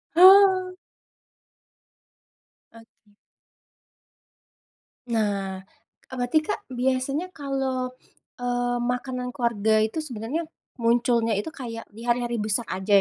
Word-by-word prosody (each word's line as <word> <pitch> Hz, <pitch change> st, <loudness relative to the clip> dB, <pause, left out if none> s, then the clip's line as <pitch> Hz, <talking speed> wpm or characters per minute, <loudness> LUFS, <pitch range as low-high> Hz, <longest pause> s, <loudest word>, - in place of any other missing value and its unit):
Oh. 370 Hz, 0 st, +7 dB, 2.0 s
Oke. 225 Hz, -2 st, -20 dB, 1.9 s
Nah, 200 Hz, -4 st, -1 dB, 0.5 s
e -, -, -9 dB
berarti, 245 Hz, +5 st, +2 dB
Kak, 415 Hz, +5 st, -4 dB
biasanya 265 Hz, +7 st, -1 dB
kalo, 265 Hz, -3 st, -3 dB, 0.5 s
eee, 245 Hz, 0 st, 0 dB, 0.2 s
makanan 250 Hz, 0 st, -4 dB
keluarga 220 Hz, -3 st, +1 dB
itu 220 Hz, +9 st, -1 dB
sebenernya 255 Hz, +4 st, -4 dB, 0.3 s
munculnya 235 Hz, -1 st, +2 dB
itu 205 Hz, +5 st, -2 dB
kayak 235 Hz, -7 st, -7 dB
di 230 Hz, -, -9 dB
hari-hari 240 Hz, 0 st, 0 dB
besar 215 Hz, +2 st, -1 dB
aja 190 Hz, +2 st, -4 dB
245 Hz, 90 wpm, -25 LUFS, 225-270 Hz, 2.0 s, Oh